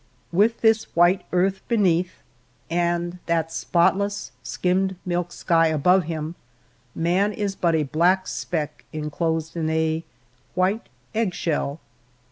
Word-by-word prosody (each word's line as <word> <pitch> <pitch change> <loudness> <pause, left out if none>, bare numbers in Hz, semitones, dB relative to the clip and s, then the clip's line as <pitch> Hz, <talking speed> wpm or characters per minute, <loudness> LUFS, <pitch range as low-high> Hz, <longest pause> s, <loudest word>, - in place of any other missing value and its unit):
With 210 +6 +2
this 220 -1 +4
white 175 +3 +5
earth 190 +2 +1
beneath, 185 -6 +1 0.5
and 175 +1 0
that 165 -1 0
spotless, 200 +5 +1
skimmed 185 +8 0
milk 175 -1 -1
sky 165 -1 +2
above 170 +4 +3
him, 160 0 -4 0.6
man 180 +5 +2
is 205 -2 -2
but 170 -3 +1
a 155 - +2
black 175 +6 +2
speck 150 -3 -3
inclosed 160 +1 -2
in 160 -2 -1
a 160 0 0 0.5
white 190 +5 0 0.2
egg 215 -4 0
shell. 150 -2 -1
175 Hz, 120 wpm, -24 LUFS, 160-190 Hz, 0.6 s, white